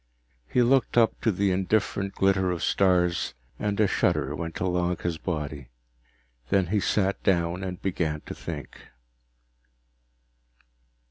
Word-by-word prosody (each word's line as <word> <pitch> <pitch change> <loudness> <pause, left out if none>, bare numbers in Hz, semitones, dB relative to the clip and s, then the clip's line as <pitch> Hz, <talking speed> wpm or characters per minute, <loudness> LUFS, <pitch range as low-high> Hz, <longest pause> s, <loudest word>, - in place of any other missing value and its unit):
He 125 - +3
looked 130 0 +2
up 115 -2 +3
to 115 - +2
the 100 0 +1
indifferent 100 +1 0
glitter 95 -1 +2
of 90 -2 -2
stars, 90 -6 +2 0.2
and 105 0 -1
a 110 - +5
shudder 75 -7 +1
went 80 0 -5
along 90 -1 0
his 85 -2 -3
body. 75 -6 -4 0.8
Then 95 -2 +3
he 105 - +3
sat 100 0 0
down 85 0 +1
and 90 -2 -5
began 80 -5 -2
to - - -8
think. 75 -4 -7
90 Hz, 130 wpm, -26 LUFS, 85-100 Hz, 0.8 s, a